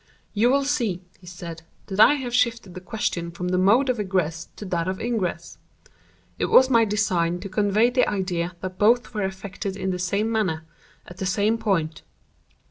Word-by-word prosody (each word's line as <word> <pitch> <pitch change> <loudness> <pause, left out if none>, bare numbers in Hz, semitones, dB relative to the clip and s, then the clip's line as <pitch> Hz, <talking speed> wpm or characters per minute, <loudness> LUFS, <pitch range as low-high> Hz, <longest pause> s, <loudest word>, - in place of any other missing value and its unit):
"You 225 +3 +3
will 280 +2 +3
see," 230 -11 -1 0.2
he 180 - -17
said, 170 -2 -8 0.2
"that 195 +1 -5
I 290 - +8
have 255 -4 -5
shifted 235 -6 +1
the 185 - -8
question 180 -4 -3
from 180 +1 -4
the 180 0 +1
mode 220 +9 +4
of 250 -3 0
egress 180 -5 -1
to 210 - -8
that 170 -2 -1
of 185 0 -2
ingress. 190 -8 -3 0.8
It - - +1
was 260 0 +6
my 230 -2 +5
design 180 -5 0
to 200 - -6
convey 210 +4 +2
the 250 0 +2
idea 180 -3 -2
that 185 0 -6
both 240 +4 +3
were 210 - -2
effected 190 0 -4
in 190 -1 -2
the 180 - -3
same 200 +5 0
manner, 185 -8 0 0.4
at 180 - -12
the 190 - -2
same 210 +4 +1
point. 175 -8 -1
195 Hz, 190 wpm, -24 LUFS, 180-225 Hz, 0.8 s, I